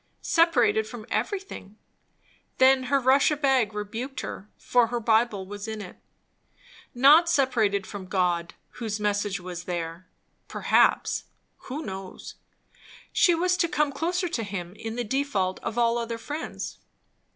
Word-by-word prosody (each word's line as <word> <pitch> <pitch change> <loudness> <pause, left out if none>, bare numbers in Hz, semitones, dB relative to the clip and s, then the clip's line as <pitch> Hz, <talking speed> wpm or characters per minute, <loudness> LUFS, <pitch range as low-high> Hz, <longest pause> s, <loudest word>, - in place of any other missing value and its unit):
Separated 240 - +3
from 220 -1 -9
everything! 385 - -4 0.8
Then 260 0 +5
her 275 +2 +2
Russia 275 +3 +3
bag 265 -7 +2
rebuked 230 +6 -5
her, 205 - -7
for 245 -2 +2
her 240 +1 -2
Bible 220 -3 +1
was 205 +2 -7
in 220 -1 -5
it. 195 -4 -9 1.0
Not 300 +7 +6
separated 225 - +2
from 195 -3 -8
God, 180 -2 0 0.2
whose 220 -3 -3
message 205 -2 -1
was 175 -1 -7
there; 170 0 -5 0.4
perhaps, - - +2 0.4
who 295 +5 -4
knows? 190 -1 -8 0.8
she 350 - +4
was 360 +2 +1
to 340 - +2
come 300 -3 0
closer 350 +6 -1
to 320 -9 -2
him, 185 -4 -5
in 225 +1 -6
the 245 - -2
default 215 -7 -1
of 230 - -5
all 235 0 +2
other 230 0 -4
friends. 295 +7 -6
230 Hz, 140 wpm, -26 LUFS, 200-275 Hz, 1.0 s, Not